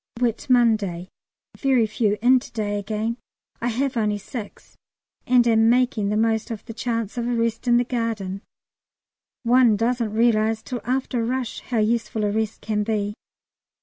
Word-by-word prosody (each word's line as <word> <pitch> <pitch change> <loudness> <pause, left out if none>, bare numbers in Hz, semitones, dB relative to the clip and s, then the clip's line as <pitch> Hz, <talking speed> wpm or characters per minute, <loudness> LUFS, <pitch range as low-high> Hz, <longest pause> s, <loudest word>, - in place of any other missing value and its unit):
Whit 240 -3 -1
Monday. 215 -8 +2 0.5
Very 260 -5 +2
few 210 -1 0
in 255 +1 +6
to - - -12
day 205 -2 -2
again. 215 +3 -3 0.4
I 235 - 0
have 255 +3 -1
only 210 -2 +1
six, 210 +1 -9 0.5
and 245 -1 +4
am 225 -1 +4
making 240 -4 +2
the 210 - 0
most 220 0 +1
of 220 -2 -6
the 225 - -7
chance 230 0 -3
of 235 - -2
a 245 - 0
rest 230 +1 -1
in 240 0 +5
the 245 - +3
garden; 225 -6 -3 1.0
one 240 -2 +4
doesn't 230 0 0
realise 220 -1 +2
till 245 -3 -5
after 255 -1 -1
a - - -1
rush 250 0 -2
how 245 - -4
useful 220 0 0
a 205 - 0
rest 220 0 -2
can 215 -1 -1
be. 210 -1 -1
230 Hz, 170 wpm, -23 LUFS, 215-240 Hz, 1.0 s, in